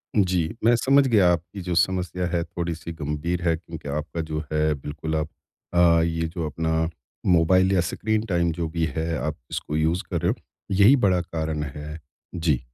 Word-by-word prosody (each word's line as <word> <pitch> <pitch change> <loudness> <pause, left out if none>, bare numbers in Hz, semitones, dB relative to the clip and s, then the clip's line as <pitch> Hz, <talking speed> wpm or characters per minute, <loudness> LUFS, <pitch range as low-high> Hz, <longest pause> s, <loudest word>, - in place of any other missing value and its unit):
जी, 90 -4 +1
मैं 120 +1 +5
समझ 135 +3 +4
गया 105 -7 +5
आपकी 90 +3 -3
जो 90 -1 -2
समस्या 90 0 +1
है 85 0 0
थोड़ी 85 0 -3
सी 85 +1 -8
गंभीर 80 +3 -2
है 80 - +3
क्योंकि 80 -3 -9
आपका 75 +3 -3
जो 75 0 -1
है 75 0 +2
बिल्कुल 80 +3 -4
आप 75 -1 0 0.5
अ, 85 -1 +5
ये 80 0 -1
जो 85 -1 -4
अपना 80 0 0 0.4
मोबाइल 90 +2 +4
या 90 - +4
स्क्रीन 110 0 0
टाइम 85 -2 +2
जो 80 0 -2
भी 80 0 0
है 80 +1 -1
आप 75 0 -3
इसको 75 - -3
यूज़ 80 +3 +1
कर - - -1
रहे - - +2
हो, - - -2 0.4
यही 100 +8 +6
बड़ा 95 -8 +2
कारण 80 -2 -3
है, 75 +3 -7 0.4
जी। 80 -7 +1
85 Hz, 190 wpm, -24 LUFS, 80-90 Hz, 0.5 s, यही